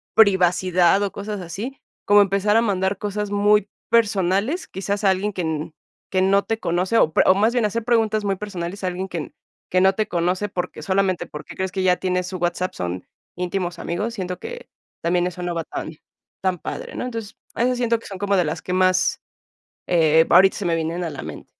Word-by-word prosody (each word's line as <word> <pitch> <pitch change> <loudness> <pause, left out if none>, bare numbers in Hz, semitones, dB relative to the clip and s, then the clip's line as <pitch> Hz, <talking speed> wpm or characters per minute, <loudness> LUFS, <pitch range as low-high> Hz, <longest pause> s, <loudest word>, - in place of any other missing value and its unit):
privacidad 185 -2 +4
o 200 -1 -1
cosas 205 0 -5
así, 205 +11 -6 0.3
como 205 0 +6
empezar 200 +2 +2
a 230 - +5
mandar 190 -3 0
cosas 210 0 -3
muy 205 0 +3 0.2
personales, 215 - +1
quizás 200 +2 -3
a - - +6
alguien 200 +3 -1
que 185 - -3
n 155 -1 -3 0.4
que 185 - +2
no 195 +1 +3
te 225 0 -2
conoce, 180 +4 0
o 155 - +3
pre - - +5
o - - +8
más 220 +4 +2
bien 245 - +1
hacer 225 +2 -1
preguntas 220 -3 +2
muy 195 -1 +1
personales 190 -1 -6
a 185 - 0
alguien 185 +1 -3
que 170 -5 -6 0.4
que 185 - +3
no 190 0 +5
te 215 +1 -1
conoce 180 +4 0
porque 180 -1 -4
solamente 190 -1 0
porque 150 - -9
crees 190 0 -2
que 190 0 -2
ya 180 -1 +4
tienes 180 -1 -1
su 185 0 -5
WhatsApp, 175 +1 -1
son 90 0 -5 0.3
íntimos 180 -1 -3
amigos, 210 +7 -3
siento 180 -3 -4
que 480 +1 -8 0.3
también 175 +1 +1
eso 180 0 -6
no 175 -1 -2
va 165 - -2
tan 155 0 -6 0.5
tan 185 -1 0
padre, - - -6
¿no? - - -3
Entonces, 225 -3 -6 0.2
esas 250 +1 +1
siento 235 -1 +1
que - - -12
son 195 - -7
como 200 0 +1
de 180 - +4
las 155 +2 -3
que 180 - -4
más, 185 0 +2 0.7
eh, 160 -2 +5
ahorita 190 +2 +6
se 205 - -4
me 165 - +1
vienen 165 +2 -2
a 165 - -3
la 140 - -7
mente. - - -8
190 Hz, 210 wpm, -22 LUFS, 180-205 Hz, 0.7 s, o